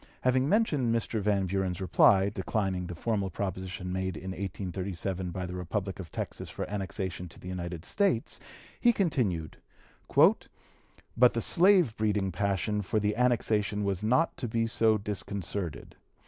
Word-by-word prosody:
Having 130 +2 +2
mentioned 155 - +2
Mr. 115 -1 -1
Van 100 -1 +1
Buren's 95 -1 -1
reply, 95 +1 +4
declining 95 -2 -2
the 85 - -6
formal 100 +1 -1
proposition 95 0 -4
made 95 -2 -2
in 95 +4 -6
1837 95 0 -4
by 90 +1 -4
the 90 - -6
Republic 95 +2 -3
of 85 -4 -7
Texas - - -5
for - - -5
annexation 95 -3 -4
to - - -14
the - - -10
United 85 -2 -5
States, 195 - 0 0.4
he 240 - +5
continued: 115 - 0 1.6
"But 125 0 +5
the 115 - 0
slave 175 - +4
breeding 105 -3 0
passion 100 +3 0
for 105 +2 0
the 105 0 0
annexation 110 -4 +1
was 100 -2 -1
not 130 +10 +2
to 125 - -3
be 115 +1 0
so 110 -1 +3
disconcerted. 100 -4 -4
100 Hz, 145 wpm, -29 LUFS, 90-110 Hz, 1.6 s, he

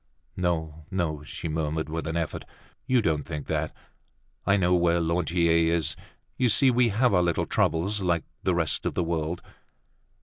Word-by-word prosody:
"No, 80 -4 -2
no," 85 -6 -2
she 75 - -6
murmured 80 0 -2
with 80 0 -4
an 80 +1 -2
effort. 85 -2 -3 0.4
"You 125 -3 +3
don't 75 -6 +1
think 75 -3 -6
that. - - -1 0.8
I 100 0 +5
know 90 -2 +2
where 85 -1 +3
Lantier 85 0 +1 0.2
is. 85 -2 0 0.4
You 125 -2 +3
see, 125 +5 +5
we 120 -1 +3
have 115 +2 +2
our 90 - +4
little 85 -1 +1
troubles 95 +6 +1
like 85 -3 +1 0.2
the 95 - +1
rest 80 -3 +1
of - - -3
the 90 - +1
world!" 85 0 -2
85 Hz, 170 wpm, -26 LUFS, 80-95 Hz, 0.8 s, I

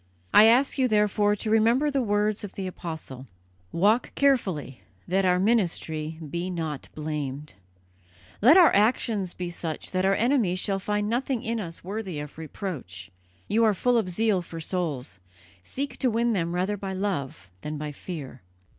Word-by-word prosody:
I 215 - +9
ask 255 +5 +4
you, 260 - +4
therefore, 210 -1 +2
to 215 +1 -3
remember 230 +7 +3
the 275 -1 +1
words 210 -1 0
of 200 - -7
the 195 - -5
Apostle: 160 -7 -7 0.4
'Walk 210 +8 +2
carefully, 190 - +1 0.3
that 190 +2 +1
our 180 0 +4
ministry 165 -7 0
be 170 +5 -3
not 160 -6 -4
blamed'; 150 -2 -4 0.9
let 265 - +7
our 355 -3 +7
actions 210 -3 +1
be 180 -1 -4
such 165 -2 -5
that 185 0 0
our 195 +1 +3
enemies 230 -6 +2
shall 195 +1 0
find 210 +1 -1
nothing 245 +1 -1
in 230 0 -2
us 170 -5 -7
worthy 190 -4 -4
of 150 +1 -8
reproach. 140 - -6 0.4
You 225 +2 +2
are 215 -2 +4
full 245 +6 +2
of 200 -5 -2
zeal 205 +1 +1
for 165 -1 -8
souls: 150 - -3 0.4
seek 275 - -5
to 260 - +1
win 235 +1 +1
them 170 -3 -1
rather 190 +3 0
by 195 -1 -5
love 145 - -3
than 150 0 -5
by 150 0 -4
fear. 145 -5 -8
190 Hz, 165 wpm, -26 LUFS, 160-220 Hz, 0.9 s, I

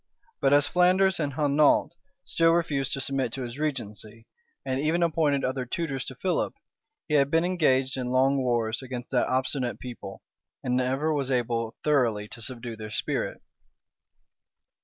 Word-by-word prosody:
But 135 - +3
as 145 0 +5
Flanders 185 +1 +3
and 145 -3 -1
Hainault 150 0 +3 0.3
still 165 0 +3
refused 145 -6 0
to 135 - -2
submit 135 -3 0
to 135 - -4
his 120 +3 -7
regency, 115 -6 -4 0.4
and 130 0 -1
even 160 +4 +1
appointed 150 -4 +1
other 130 0 -1
tutors 135 0 -3
to 130 - -7
Philip, 185 +7 -1 0.5
he 150 - -3
had 140 -2 +4
been 165 +3 +2
engaged 135 -7 +2
in 125 -1 -2
long 135 +2 +3
wars 120 -2 0
against 125 -2 -7
that 125 - +2
obstinate 130 -1 -1
people, 120 -6 -8 0.4
and 125 -1 0
never 135 +5 +1
was 140 -3 -1
able 115 -3 -1
thoroughly 120 -8 +2
to 115 - -9
subdue 120 -1 -6
their 110 -1 -8
spirit. - - -3
135 Hz, 160 wpm, -27 LUFS, 125-150 Hz, 0.5 s, as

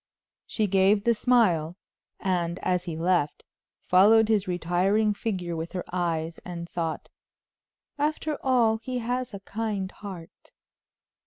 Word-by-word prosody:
She 215 - 0
gave 195 +1 +3
the 235 - +4
smile, 195 -9 +2 0.4
and 175 -2 -1
as 180 -1 0
he 165 -3 -4
left, 170 -3 0 0.4
followed 215 +4 +6
his 210 -3 +2
retiring 185 +5 +1
figure 185 -5 -3
with 165 +1 -5
her 180 - -3
eyes, 165 -2 -2
and 170 -1 -6
thought: 165 -2 -4 0.9
"After 305 +1 -1
all, 240 -4 +3
he 250 +3 -5
has 245 -1 -3
a 195 - -8
kind 205 -2 -3
heart." 185 -5 -11
190 Hz, 130 wpm, -26 LUFS, 175-220 Hz, 0.9 s, followed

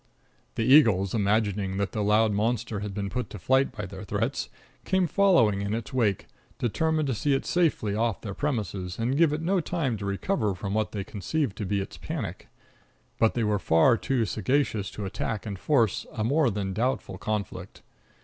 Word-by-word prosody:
The 115 - 0
eagles, 110 -10 +5
imagining 100 -2 +1
that 100 0 -1
the 105 - -2
loud 105 +1 +3
monster 110 +1 -1
had 105 0 -4
been 100 -1 -2
put 115 0 -3
to - - -8
flight 130 +7 +2
by 105 -6 -6
their 95 +1 -8
threats, 100 - -2 0.3
came 190 -1 +2
following 170 - +3
in 100 +2 -1
its 115 +1 -6
wake, 110 -7 +1 0.3
determined 155 +6 0
to 135 - 0
see 135 +6 +1
it 135 - -2
safely 160 - +1
off 110 -1 0
their 100 -3 -5
premises 100 -9 -3
and 120 +4 0
give 160 0 +4
it 155 +2 -2
no 190 +3 +2
time 155 -8 -1
to 100 - -6
recover 105 - -1
from 100 +2 -4
what 110 0 0
they 100 -2 -3
conceived 115 +4 -2
to 105 - -3
be 100 0 0
its 95 - -7
panic. - - -5 0.7
But 110 - +3
they 120 - +1
were 105 -1 +1
far 90 +9 +4
too 120 0 0
sagacious 110 +1 0
to 105 - -6
attack 100 +2 -3
and 100 -3 -5
force 115 -6 +1
a 110 - -3
more 140 +4 +3
than 100 -2 -3
doubtful 110 -3 -2
conflict. 105 -2 -4
110 Hz, 190 wpm, -27 LUFS, 100-130 Hz, 0.7 s, eagles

